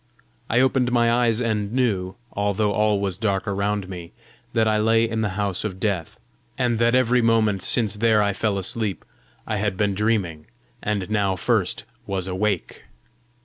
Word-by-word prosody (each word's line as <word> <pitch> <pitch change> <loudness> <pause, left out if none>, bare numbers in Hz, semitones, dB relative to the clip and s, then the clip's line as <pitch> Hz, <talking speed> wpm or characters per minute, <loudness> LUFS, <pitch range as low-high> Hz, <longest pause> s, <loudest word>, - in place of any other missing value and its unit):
I 120 +3 +3
opened 130 -1 +2
my 120 -1 +3
eyes 120 -2 +2
and 110 -4 -1
knew, 100 -8 0 0.2
although 100 +1 0
all 105 -1 +2
was 95 -1 -2
dark 100 -2 -1
around 100 0 -1
me, 90 -3 -8 0.4
that 115 -1 +2
I 110 0 +2
lay 115 +1 +3
in 110 0 -2
the 105 -3 -2
house 100 -3 -1
of 95 -3 -4
death, 95 -6 -2 0.4
and 120 -3 +1
that 120 +1 +3
every 125 -1 +3
moment 110 -4 +2
since 105 +1 +2
there 110 0 +3
I 100 -1 +1
fell 105 -1 -1
asleep 100 +1 -2 0.4
I 110 - -2
had 100 -2 -1
been 100 -1 +1
dreaming, 95 -7 -1 0.3
and 100 -3 -2
now 100 -3 +1
first 90 - 0 0.2
was 95 -2 -1
awake. 95 0 -2
105 Hz, 170 wpm, -23 LUFS, 95-115 Hz, 0.4 s, I